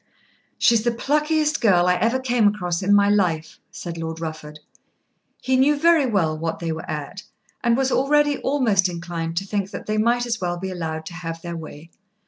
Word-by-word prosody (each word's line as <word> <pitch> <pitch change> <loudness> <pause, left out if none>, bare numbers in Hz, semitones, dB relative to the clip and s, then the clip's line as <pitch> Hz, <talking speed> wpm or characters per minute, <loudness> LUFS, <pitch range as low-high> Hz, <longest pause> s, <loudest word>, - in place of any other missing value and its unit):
"She - - +4
is 225 - +3
the 240 - +2
pluckiest 300 +5 0
girl 180 -6 +4
I 180 - +4
ever 230 +6 +1
came 245 -4 +2
across 180 -4 -1
in 195 +2 0
my 205 0 +5
life," 170 -6 0
said 170 -1 -7
Lord 160 0 -5
Rufford. 155 -2 -7 0.9
He 260 - +1
knew 280 +3 +3
very 325 -2 +4
well 175 -9 +1
what 165 +1 -3
they 165 -1 -3
were 160 - -6
at, - - -5 0.4
and 235 -1 +3
was 265 0 +1
already 290 +1 +2
almost 225 -9 +2
inclined 170 -1 -5
to 195 - -1
think 200 -1 -2
that - - -8
they 215 0 -1
might 240 +2 +2
as 230 -3 -3
well 175 -1 -2
be 190 +2 -5
allowed 160 -3 -4
to 170 - -8
have 165 -1 -6
their 170 -1 -5
way. 160 0 -10
195 Hz, 200 wpm, -22 LUFS, 165-245 Hz, 0.9 s, my